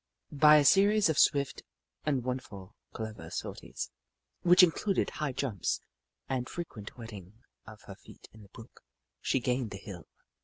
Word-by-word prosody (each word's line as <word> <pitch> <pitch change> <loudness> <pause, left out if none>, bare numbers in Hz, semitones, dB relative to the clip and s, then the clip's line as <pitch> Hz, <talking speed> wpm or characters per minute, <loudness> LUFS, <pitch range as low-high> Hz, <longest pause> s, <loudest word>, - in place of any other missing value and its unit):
By 150 +1 +7
a 150 -1 +5
series 200 +2 +5
of 155 - +1
swift 140 -1 +2 0.5
and 135 -5 +1
wonderfully 120 -7 -5 0.2
clever 110 -1 -7
sorties, - - -6 0.5
which 180 +1 +7
included 185 +3 +1
high 150 -2 -3
jumps 125 - -2 0.5
and 130 -2 -2
fre 175 - -4
quent 105 -10 -11
wetting 105 -5 -10 0.3
of - - -12
her - - -10
feet - - -16
in 110 - -15
the 100 - -16
brook, 115 +4 -14 0.4
she 135 - +1
gained 125 -1 -1
the 100 - -7
hill. 95 -3 -10
130 Hz, 155 wpm, -30 LUFS, 110-150 Hz, 0.5 s, By